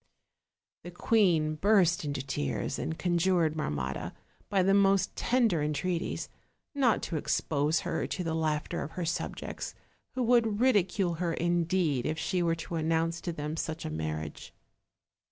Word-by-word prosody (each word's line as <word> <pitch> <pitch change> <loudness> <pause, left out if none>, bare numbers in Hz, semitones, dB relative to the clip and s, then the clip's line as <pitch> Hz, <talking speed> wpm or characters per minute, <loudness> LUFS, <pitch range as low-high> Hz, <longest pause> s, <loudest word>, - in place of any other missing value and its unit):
The 175 - -7
queen 175 -5 +2
burst 180 0 +3
into 140 -2 -3
tears, 70 - -2
and 160 - -3
conjured 175 -2 +2
Marmotta, 70 - -3 0.4
by 195 -2 +3
the 195 +1 +3
most 195 -1 +3
tender 230 -10 +2
entreaties, 160 +4 -2 0.5
not 265 -6 +2
to 165 - -2
expose 150 +1 0
her 175 - -2
to 185 - -3
the 165 -1 -2
laughter 155 -2 -1
of 155 - -6
her 180 -2 -3
subjects, 165 +1 -4 0.4
who 255 - 0
would 230 -3 +3
ridicule 195 -7 +2
her 170 -2 0
indeed 170 -5 +1
if 155 +1 -2
she 180 +2 -1
were 165 -1 +2
to 165 - -7
announce 165 +1 0
to 175 - -3
them 150 -1 -4
such 160 0 -4
a - - -3
marriage. 80 0 -5
165 Hz, 150 wpm, -30 LUFS, 155-190 Hz, 0.5 s, burst